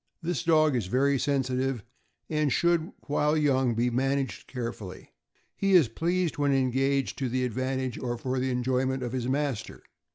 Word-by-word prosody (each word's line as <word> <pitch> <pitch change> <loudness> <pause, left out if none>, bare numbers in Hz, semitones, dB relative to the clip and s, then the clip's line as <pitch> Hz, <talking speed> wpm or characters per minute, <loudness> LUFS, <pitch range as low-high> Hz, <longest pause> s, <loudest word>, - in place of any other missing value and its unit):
This 175 +2 -1
dog 155 -3 +4
is 115 -6 -1
very 135 +6 +2
sensitive, 130 -3 0 0.4
and 150 -2 0
should, 170 -1 +2
while 150 +1 +1
young, 130 -5 +2
be 120 +2 +1
managed 135 +2 -1
carefully. 115 -7 -7 0.4
He 195 -1 +1
is 175 -6 +7
greatly - - -26
pleased 175 -1 0
when 145 -1 +2
engaged 135 +1 +1
to 130 -2 -1
the 130 +1 0
advantage 130 +1 -2
or 120 -1 -3
for 130 +2 -2
the 130 +1 0
enjoyment 130 +1 0
of 120 - -3
his 125 -1 -2
master. 140 -4 -2
130 Hz, 165 wpm, -28 LUFS, 125-145 Hz, 0.4 s, is